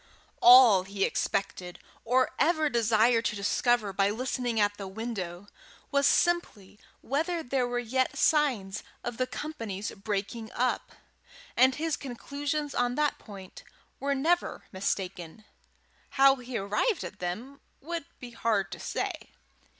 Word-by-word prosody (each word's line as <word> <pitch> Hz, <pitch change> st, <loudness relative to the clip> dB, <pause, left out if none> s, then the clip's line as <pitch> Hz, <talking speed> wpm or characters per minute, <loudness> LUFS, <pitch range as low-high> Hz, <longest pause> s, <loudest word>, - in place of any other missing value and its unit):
All 240 Hz, -5 st, +9 dB
he 195 Hz, +1 st, -3 dB
expected, 185 Hz, -2 st, -2 dB, 0.3 s
or 255 Hz, +2 st, +2 dB
ever 315 Hz, -2 st, +3 dB
desired 230 Hz, 0 st, +3 dB
to 215 Hz, -, 0 dB
discover, 210 Hz, +1 st, +1 dB
by 195 Hz, +1 st, +2 dB
listening 245 Hz, +1 st, -2 dB
at 205 Hz, 0 st, +2 dB
the 195 Hz, -, -6 dB
window, 190 Hz, -4 st, -5 dB, 0.5 s
was 280 Hz, -1 st, +3 dB
simply 220 Hz, -, 0 dB, 0.2 s
whether 325 Hz, +5 st, -1 dB
there 250 Hz, 0 st, 0 dB
were 245 Hz, 0 st, -2 dB
yet 255 Hz, +2 st, -1 dB
signs 245 Hz, -11 st, +1 dB, 0.2 s
of 240 Hz, -1 st, -5 dB
the 255 Hz, -, 0 dB
company's 225 Hz, -12 st, -5 dB
breaking 210 Hz, +2 st, -4 dB
up; 250 Hz, 0 st, -1 dB, 0.6 s
and 260 Hz, +2 st, +5 dB
his 320 Hz, 0 st, -1 dB
conclusions 285 Hz, +3 st, -4 dB
on 245 Hz, 0 st, 0 dB
that 300 Hz, 0 st, 0 dB
point 195 Hz, -4 st, -11 dB, 0.4 s
were 280 Hz, 0 st, 0 dB
never 335 Hz, +6 st, 0 dB
mistaken: 190 Hz, 0 st, -4 dB, 0.6 s
how 270 Hz, 0 st, +5 dB
he 250 Hz, -1 st, -5 dB
arrived 210 Hz, -, 0 dB
at 205 Hz, -, -8 dB
them 225 Hz, +11 st, -5 dB, 0.2 s
it -, -, -27 dB
would 335 Hz, -2 st, -4 dB
be 245 Hz, -1 st, -9 dB
hard 215 Hz, -7 st, 0 dB
to -, -, -7 dB
say. -, -, -4 dB
240 Hz, 135 wpm, -28 LUFS, 200-275 Hz, 0.6 s, All